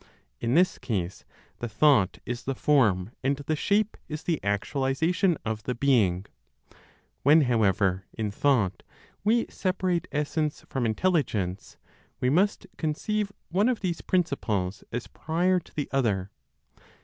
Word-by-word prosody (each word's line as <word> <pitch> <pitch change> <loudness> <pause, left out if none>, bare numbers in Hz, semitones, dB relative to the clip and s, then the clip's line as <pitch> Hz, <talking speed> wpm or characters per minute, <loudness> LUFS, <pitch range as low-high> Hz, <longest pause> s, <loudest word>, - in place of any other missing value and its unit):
In 120 +3 0
this 180 +2 +3
case 100 -5 -3 0.3
the 120 - -4
thought 110 -4 +3
is 120 +1 -5
the 135 - -1
form, 110 -10 +2
and 135 +1 +1
the 145 +2 -2
shape 205 +6 +1
is 155 +1 -6
the 165 -4 -1
actualization 140 - +1
of 110 -1 -2
the 125 +4 -3
being. 110 -9 +2 1.0
When, 150 +4 +6
however, 100 -7 +2
in 110 -2 -3
thought 100 -7 +1 0.4
we 230 +3 +3
separate 185 -2 -1
essence 150 +1 -1
from 125 -3 -1
Intelligence, 110 - -1 0.4
we 125 - +1
must 195 +7 +2
conceive 200 +7 -1 0.2
one 200 +7 +2
of 250 - -1
these 175 -4 -2
principles 110 - -1
as 120 0 -3
prior 180 +3 0
to 170 - -20
the 145 - -2
other. 105 -8 0
135 Hz, 135 wpm, -27 LUFS, 105-170 Hz, 1.0 s, When